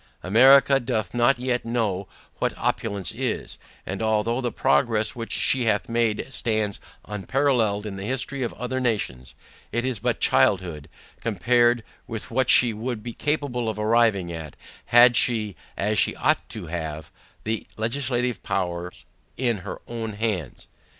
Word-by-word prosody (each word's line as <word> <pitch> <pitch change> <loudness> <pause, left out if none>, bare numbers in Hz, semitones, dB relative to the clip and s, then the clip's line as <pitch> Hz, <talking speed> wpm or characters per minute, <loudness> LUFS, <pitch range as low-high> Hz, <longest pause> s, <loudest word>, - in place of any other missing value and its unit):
America 135 +7 +6
doth 120 -4 -2
not 120 +2 +3
yet 125 0 -1
know 110 -5 -1 0.3
what - - -1
opulence 100 -2 -1
is; - - -3 0.3
and 95 +2 -4
although 110 +3 +1
the 120 -2 -1
progress 105 +9 +1
which 115 -1 -6
she 130 -3 +2
hath 105 -2 +1
made 115 -2 0
stands 110 -4 0 0.3
unparalleled 110 0 0
in 100 -2 -5
the 95 - -6
history 130 +4 -2
of 120 - -1
other 125 +2 -3
nations, 100 - -2 0.4
it 120 +3 -1
is 130 -5 -2
but - - -1
childhood, 85 0 +2 0.3
compared 120 +3 +2 0.2
with 115 -1 -5
what 130 +2 +1
she 120 -2 +6
would 110 0 -4
be 120 0 -6
capable 140 -6 -1
of 110 - -4
arriving 105 -4 +2
at, 80 -3 -7 0.3
had 120 +1 +6
she, 110 -5 +2 0.2
as 105 0 +1
she - - +2
ought - - +1
to - - -6
have, 80 -2 -5 0.3
the 110 +1 -3
legislative 125 0 -1
powers 90 -1 -3 0.3
in 120 -3 +1
her 90 - -8
own 115 -2 -4
hands. 105 - -3
115 Hz, 150 wpm, -24 LUFS, 100-120 Hz, 0.4 s, America